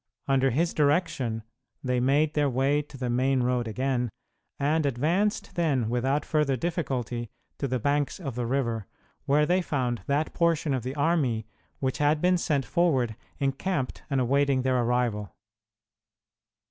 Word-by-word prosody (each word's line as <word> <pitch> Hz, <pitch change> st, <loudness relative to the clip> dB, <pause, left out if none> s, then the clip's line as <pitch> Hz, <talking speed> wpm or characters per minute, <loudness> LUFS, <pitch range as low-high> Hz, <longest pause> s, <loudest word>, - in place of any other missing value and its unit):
Under 135 Hz, -1 st, +3 dB
his 165 Hz, +7 st, +1 dB
direction 145 Hz, -7 st, +1 dB, 0.4 s
they 125 Hz, -2 st, +1 dB
made 145 Hz, +5 st, +2 dB
their 145 Hz, -2 st, +2 dB
way 135 Hz, +3 st, +2 dB
to 145 Hz, -1 st, -13 dB
the 125 Hz, -1 st, -3 dB
main 130 Hz, +2 st, +2 dB
road 125 Hz, -1 st, 0 dB
again, 125 Hz, +1 st, -1 dB, 0.5 s
and 155 Hz, +3 st, +2 dB
advanced 165 Hz, -, 0 dB
then 145 Hz, -10 st, +1 dB
without 135 Hz, +4 st, 0 dB
further 150 Hz, -3 st, +1 dB
difficulty 125 Hz, -, -2 dB, 0.3 s
to 140 Hz, -, -1 dB
the 130 Hz, 0 st, 0 dB
banks 145 Hz, -, 0 dB
of 140 Hz, -8 st, -4 dB
the 120 Hz, 0 st, -2 dB
river, 115 Hz, -5 st, -1 dB, 0.4 s
where 150 Hz, +2 st, +4 dB
they 180 Hz, +3 st, +2 dB
found 125 Hz, -8 st, -1 dB
that 145 Hz, +3 st, 0 dB
portion 165 Hz, -3 st, +1 dB
of 130 Hz, -, 0 dB
the 130 Hz, +4 st, -5 dB
army 140 Hz, -8 st, +1 dB, 0.3 s
which 130 Hz, -1 st, -2 dB
had 150 Hz, +1 st, +3 dB
been 180 Hz, +2 st, +3 dB
sent 145 Hz, -6 st, 0 dB
forward 135 Hz, -11 st, +1 dB, 0.2 s
encamped 135 Hz, +1 st, -2 dB
and 135 Hz, -2 st, +1 dB
awaiting 135 Hz, +1 st, +2 dB
their 130 Hz, -1 st, +2 dB
arrival. 120 Hz, -4 st, -1 dB
135 Hz, 150 wpm, -27 LUFS, 125-150 Hz, 0.5 s, where